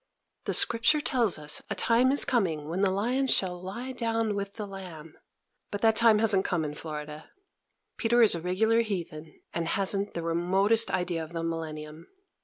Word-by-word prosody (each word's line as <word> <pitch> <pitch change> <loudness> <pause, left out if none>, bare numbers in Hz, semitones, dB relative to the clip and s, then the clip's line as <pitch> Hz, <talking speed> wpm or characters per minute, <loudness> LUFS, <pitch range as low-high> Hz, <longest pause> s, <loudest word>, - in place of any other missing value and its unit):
The - - 0
Scripture 235 +6 +3
tells 245 - +1
us 150 -1 -1
a - - -2
time 245 +3 +3
is 285 - +4
coming 180 - -1
when 175 +4 -3
the 200 - +3
lion 245 +8 0
shall 180 -7 0
lie 235 +8 -6
down 230 -3 -1
with 200 0 -4
the 215 - -6
lamb; 180 -6 -10 0.6
but 205 - -5
that 225 -1 +4
time 225 -1 +5
hasn't 210 -3 +3
come 170 -3 -1
in 150 - -5
Florida. 150 0 -8 0.7
Peter 235 +1 +3
is 220 - +5
a 170 - -3
regular 220 +6 +2
heathen, 170 -7 -6
and 170 -1 -2
hasn't 195 +2 0
the 170 - -3
remotest 190 +7 +2
idea 175 -2 -2
of 160 +2 -11
the 165 -1 -3
millennium. 160 -1 -6
195 Hz, 180 wpm, -27 LUFS, 165-225 Hz, 0.7 s, time